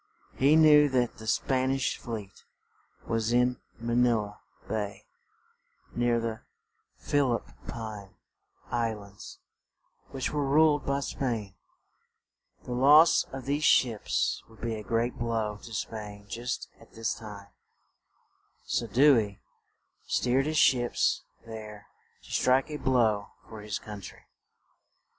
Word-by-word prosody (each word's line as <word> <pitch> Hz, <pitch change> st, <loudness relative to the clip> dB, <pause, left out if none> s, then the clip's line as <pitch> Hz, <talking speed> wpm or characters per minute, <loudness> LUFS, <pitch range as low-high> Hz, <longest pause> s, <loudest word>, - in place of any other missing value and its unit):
He 140 Hz, +4 st, +4 dB
knew 150 Hz, -2 st, +7 dB
that 125 Hz, -3 st, 0 dB
the 110 Hz, -, -10 dB
Span 130 Hz, +3 st, +1 dB
ish 135 Hz, 0 st, -1 dB
fleet 110 Hz, -5 st, -7 dB, 0.6 s
was 115 Hz, 0 st, -1 dB
in 125 Hz, 0 st, +2 dB, 0.2 s
Ma 115 Hz, 0 st, -3 dB
ni 125 Hz, 0 st, +4 dB
la 105 Hz, -3 st, -2 dB, 0.3 s
Bay, 105 Hz, -2 st, -4 dB, 0.9 s
near 120 Hz, -1 st, +2 dB
the 115 Hz, -1 st, -4 dB, 0.6 s
Phil 140 Hz, -4 st, +1 dB
ip -, -, -7 dB, 0.2 s
pine 110 Hz, -4 st, -7 dB, 0.5 s
Is -, -, -21 dB
lands, 110 Hz, -4 st, -4 dB, 0.7 s
which 130 Hz, -1 st, -3 dB
were 150 Hz, -1 st, -1 dB
ruled 150 Hz, 0 st, +3 dB
by 140 Hz, 0 st, 0 dB
Spain; 115 Hz, -8 st, -3 dB, 1.1 s
the -, -, -8 dB
loss 145 Hz, +6 st, +6 dB
of 135 Hz, -1 st, -7 dB
these 145 Hz, +2 st, -1 dB
ships 120 Hz, -7 st, +2 dB
would 115 Hz, -, -18 dB
be 115 Hz, -1 st, -2 dB
a 110 Hz, -, -5 dB
great 115 Hz, +4 st, -1 dB
blow 110 Hz, -3 st, -1 dB
to 115 Hz, -, -11 dB
Spain 105 Hz, -1 st, -6 dB
just 120 Hz, +4 st, -4 dB
at -, -, -19 dB
this 115 Hz, -1 st, -2 dB
time; 105 Hz, -3 st, -10 dB, 1.2 s
so 115 Hz, -, -1 dB
Dew 130 Hz, +4 st, +5 dB
ey 105 Hz, -2 st, -4 dB, 0.7 s
steered 130 Hz, +3 st, +1 dB
his 155 Hz, 0 st, -1 dB
ships 120 Hz, -4 st, +3 dB, 0.2 s
there 110 Hz, -2 st, -9 dB, 0.4 s
to -, -, -14 dB
strike 130 Hz, +4 st, +2 dB
a 150 Hz, -, -3 dB
blow 115 Hz, -7 st, +1 dB, 0.2 s
for 110 Hz, -2 st, -9 dB
his 105 Hz, -1 st, -3 dB
coun 105 Hz, -2 st, -9 dB
try. -, -, -11 dB
115 Hz, 135 wpm, -28 LUFS, 110-130 Hz, 1.2 s, knew